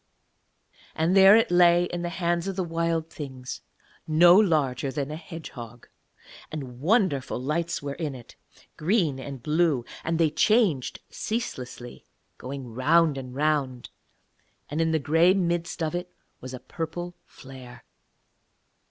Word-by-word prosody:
And 165 +4 +1
there 195 +1 +8
it 225 -5 +3
lay 175 0 +5
in 175 0 -4
the 175 - -2
hands 170 0 -1
of 195 - -3
the 185 - -1
Wild 165 -1 -1
Things 130 -4 -7 0.5
no 170 +3 +7
larger 145 - +2
than 140 0 -3
a - - -4
hedgehog; 125 - -10 0.6
and 130 -5 -7
wonderful 170 - +1
lights 155 +5 -2
were 140 -1 -3
in 150 -3 -4
it, 120 -2 -13 0.4
green 160 -5 +1
and 135 -2 -8
blue; 150 -5 +1 0.2
and 165 0 -1
they 160 -2 +2
changed 185 - +2
ceaselessly, 125 - -5 0.3
going 130 -2 -7
round 155 +5 +3
and 130 -2 -7
round, 140 -4 -1 0.8
and 150 +3 -1
in 165 - +2
the 160 - +2
grey 165 +5 +3
midst 175 -2 -1
of 155 - -1
it 175 0 -4 0.3
was 130 +1 -7
a - - -9
purple 175 +4 -6
flare. 130 -2 -13
160 Hz, 140 wpm, -26 LUFS, 135-175 Hz, 0.8 s, there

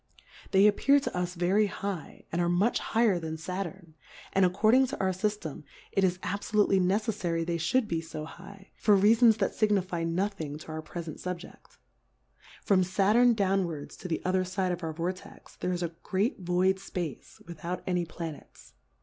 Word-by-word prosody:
They 195 +1 +5
appear 275 +7 +5
to 275 - -4
us 180 0 -2
very 190 +5 +2
high, 195 -5 -6
and 170 - 0
are 175 - +1
much 190 +7 +2
higher 220 -5 +2
than 160 -1 -5
Saturn; 180 0 -6 0.4
and 195 - +4
accord 200 +5 +3
ing 260 +1 +5
to 275 - -6
our 190 -1 +1
Syftem, 190 -5 -3 0.3
it 195 - +1
is 180 -1 +2
abfolutely 200 -1 +1
ne 185 +2 +3
ceffary 190 -7 -1
they 170 0 -1
iliould 220 +9 +1
be 165 -3 -1
fo 155 -1 -7
high, 195 +4 -13
for 210 - +4
Rea 205 +3 +6
fons 230 -2 +5
that 195 - +1
fignifie 185 -6 0
nothing 165 -4 -2
to 155 - -12
our 155 0 -4
prefent 165 -1 -7
Subjeft. 180 -1 -8 0.9
From 185 -2 +4
Saturn 210 +6 +4
downwards 185 -7 -1
to - - -7
the 165 - -2
otherfide 185 0 0
of 175 0 -6
our 160 - -2
Vortex, 175 +3 -6
there 180 - -2
is 175 -1 -2
a 170 -1 -3
great 205 +6 -1
void 185 +1 +1
Space 180 -6 -6
without 170 +1 -5
any 180 -1 0
Planets. 165 -2 -9
185 Hz, 175 wpm, -29 LUFS, 170-200 Hz, 0.9 s, Rea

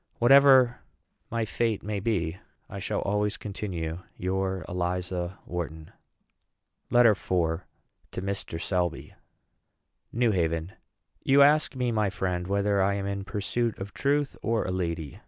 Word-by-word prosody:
Whatever 130 -1 +6 0.5
my 115 -1 -1
fate 115 -1 -1
may 105 -1 -2
be, 95 -6 -1 0.3
I - - -7
shall - - -2
always 105 +1 0
continue 90 -6 -4 0.2
your 95 0 -2
ELIZA 90 0 -2
WHARTON. 80 -3 -5 1.0
LETTER 120 -2 +6
IV. 90 -4 0 0.5
TO - - -5
MR. 100 -4 -3
SELBY. 90 -2 -1 1.0
NEW 120 -1 +2
HAVEN. 85 -2 -1 0.5
You 140 +1 +6
ask 150 0 +4
me, 125 -2 0
my 110 -3 +1
friend, 90 -2 -2
whether 100 0 +1
I 100 +1 +2
am 100 -1 -3
in 100 0 -3
pursuit 110 +3 -2
of 100 +1 -7
truth, 145 0 0
or 115 -1 0
a - - -2
lady. 85 -5 -3
100 Hz, 135 wpm, -27 LUFS, 90-115 Hz, 1.0 s, Whatever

